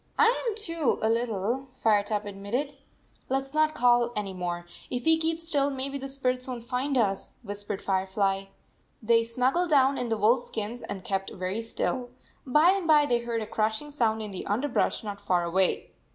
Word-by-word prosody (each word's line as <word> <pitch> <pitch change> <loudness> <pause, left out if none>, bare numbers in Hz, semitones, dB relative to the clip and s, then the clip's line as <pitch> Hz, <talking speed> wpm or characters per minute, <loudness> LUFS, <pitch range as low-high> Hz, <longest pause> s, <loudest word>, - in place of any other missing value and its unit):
"I 455 +1 +6 0.2
am 430 - -3
too, 335 - -1
a 220 - +3
little," 230 +2 -1
Firetop 210 -1 +1
admitted. 215 +9 -3 0.2
" - - -34
Let 270 +1 +2
s 270 +1 -8
not 310 0 +2
call 240 -1 +4
any 200 -2 -3
more. 175 -1 -4 0.2
If 245 -1 -3
\ve 320 0 +4
keep 325 0 0
still, 295 -4 +1
maybe 275 +1 -4
the 275 0 -5
spirits 255 -2 -1
won 250 -2 -4
t 230 - -15
find 260 +3 -1
us," 195 -5 0
whis 205 -1 -6
pered 205 -1 -4
Firefly. 195 0 0 0.6
They 230 +1 +4
snuggled 255 +9 +1
down 275 -2 +4
in 245 -1 -2
the 225 - 0
wolf 225 +4 +4
skins 225 +1 -4
and 195 -2 -6
kept 195 -1 -1
very 185 +4 -3
still. 245 +2 -2 0.4
By 300 +7 +6
and 385 -3 -1
by 300 -2 +6
they 240 -4 +2
heard 235 -1 -2
a - - -5
crashing 220 +7 -1
sound 220 -6 +1
in 210 - -6
the 190 - -6
underbrush 240 +4 0
not 205 -1 -6
far 180 -3 +1
away. 180 +2 +1
235 Hz, 195 wpm, -27 LUFS, 205-275 Hz, 0.6 s, I